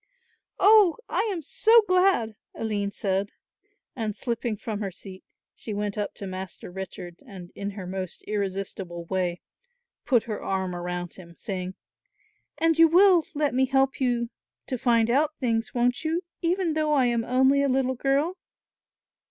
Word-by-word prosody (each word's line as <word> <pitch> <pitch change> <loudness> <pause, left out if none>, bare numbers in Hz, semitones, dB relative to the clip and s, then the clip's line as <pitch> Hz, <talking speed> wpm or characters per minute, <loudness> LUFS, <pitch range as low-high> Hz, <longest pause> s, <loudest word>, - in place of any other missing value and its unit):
"Oh, 415 -3 +6
I 445 - +1
am 340 -4 -4
so 450 - +5
glad," 365 - +3 0.2
Aline 205 -2 -2
said, 200 0 -1 0.7
and 220 -4 -3
slipping 235 -3 -2
from 215 0 -4
her 200 -2 -2
seat 190 0 -11 0.3
she 215 - -6
went 205 0 -2
up 210 -1 -3
to 200 - -7
Master 185 -1 -7
Richard 180 -2 -8
and, 185 -5 -10
in 200 - -4
her 190 - -5
most 185 -1 -5
irresistible 195 -4 -4
way, 180 -1 -2 0.6
put 245 -5 +3
her 215 -3 -5
arm 190 -2 -2
around 175 0 -4
him, 170 -2 -13
saying: 185 -1 -5 0.8
"And 325 0 +2
you 330 - +9
will 360 0 +5
let 290 -2 +1
me 260 +1 +2
help 270 +1 +1
you 240 -2 0 0.3
to 255 - -4
find 230 -1 +3
out 300 +4 +2
things, 230 -2 0
won't 245 +3 +1
you, 325 +3 -1 0.2
even 345 -1 +1
though 305 -1 +1
I 270 -3 +4
am 235 -1 +1
only 265 +3 +3
a 280 - +2
little 260 0 +1
girl?" 280 +8 0
230 Hz, 160 wpm, -26 LUFS, 195-280 Hz, 0.8 s, you